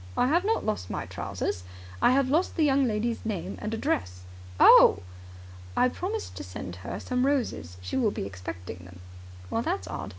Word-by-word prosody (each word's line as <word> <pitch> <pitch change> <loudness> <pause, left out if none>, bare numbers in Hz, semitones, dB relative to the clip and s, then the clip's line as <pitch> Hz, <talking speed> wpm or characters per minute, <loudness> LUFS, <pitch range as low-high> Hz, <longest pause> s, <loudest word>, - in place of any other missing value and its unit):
"I - - +4
have 330 +7 +3
not 445 +3 0
lost 215 - -2
my - - -3
trousers. 90 - -4 0.4
I - - +6
have 270 0 +3
lost 315 +7 +1
the 320 - +2
young 275 -2 +3
lady's 225 +1 -1
name 205 -6 -4
and 215 - -3
address." 90 - -2 0.4
"Oh!" - - +8 0.7
"I 255 - +4
promised 410 - -4
to - - -5
send 90 -1 -7
her 90 - -6
some 250 0 -1
roses. 230 - -1
She 90 - -3
will 240 -5 +3
be 150 - -4
expecting 90 -2 -7
them." 90 0 -13 0.6
"That's 95 -1 -2
odd. 85 -2 -5
215 Hz, 175 wpm, -27 LUFS, -, 0.7 s, Oh